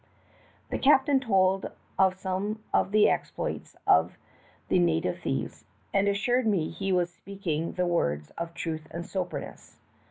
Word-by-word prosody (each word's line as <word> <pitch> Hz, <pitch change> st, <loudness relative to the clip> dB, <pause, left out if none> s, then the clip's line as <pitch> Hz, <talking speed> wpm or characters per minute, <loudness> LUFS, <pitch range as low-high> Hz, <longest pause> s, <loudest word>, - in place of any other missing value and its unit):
The -, -, -1 dB
captain 275 Hz, 0 st, +5 dB
told 195 Hz, -5 st, +2 dB, 0.3 s
of 190 Hz, -1 st, +4 dB
some 195 Hz, +3 st, -3 dB
of -, -, +3 dB
the 210 Hz, +1 st, +5 dB
exploits -, -, -2 dB
of 80 Hz, +2 st, +4 dB, 0.5 s
the -, -, +3 dB
native 85 Hz, -2 st, +1 dB
thieves, -, -, -3 dB, 0.3 s
and 200 Hz, 0 st, +3 dB
assured 240 Hz, +5 st, +1 dB
me 185 Hz, -7 st, +1 dB
he 195 Hz, +3 st, -3 dB
was 175 Hz, -1 st, +1 dB
speaking 170 Hz, -4 st, -4 dB
the 180 Hz, -, 0 dB
words 75 Hz, -, 0 dB
of 170 Hz, 0 st, -6 dB
truth 160 Hz, -2 st, -4 dB
and 170 Hz, 0 st, -6 dB
soberness. 185 Hz, -2 st, -5 dB
185 Hz, 140 wpm, -28 LUFS, 165-200 Hz, 0.5 s, captain